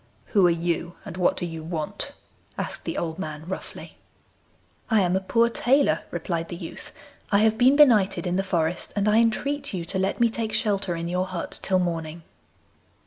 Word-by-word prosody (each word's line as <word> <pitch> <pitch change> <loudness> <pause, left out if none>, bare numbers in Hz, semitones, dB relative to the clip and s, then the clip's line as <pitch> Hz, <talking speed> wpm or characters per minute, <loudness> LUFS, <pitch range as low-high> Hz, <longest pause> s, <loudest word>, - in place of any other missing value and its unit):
'Who 195 -5 +6
are - - +4
you, 170 0 -1
and - - -7
what 185 -1 +2
do - - -1
you 165 -2 -6
want?' 155 -1 -4 0.4
asked - - -5
the - - -3
old 165 +1 -3
man 155 -3 -5
roughly. 190 - -7 0.9
'I 220 -2 +4
am 180 -2 +2
a - - +3
poor 230 +5 +3
tailor,' 265 +4 +2
replied 170 -1 -3
the - - -5
youth. 170 -1 -9 0.4
'I 200 - +5
have 220 +1 +4
been 255 +3 +6
benighted 230 -11 +5
in 180 0 0
the 190 - +2
forest, 175 -3 -1
and 205 0 +1
I 210 +1 +5
entreat 275 +3 0
you 170 -2 -4
to 190 +3 0
let 190 +1 -1
me 235 - +5
take 225 -1 -3
shelter 200 -4 0
in 170 0 -4
your 180 +2 -1
hut 180 -2 -5
till 190 - +1
morning. 165 -2 -2
185 Hz, 195 wpm, -25 LUFS, 170-215 Hz, 0.9 s, Who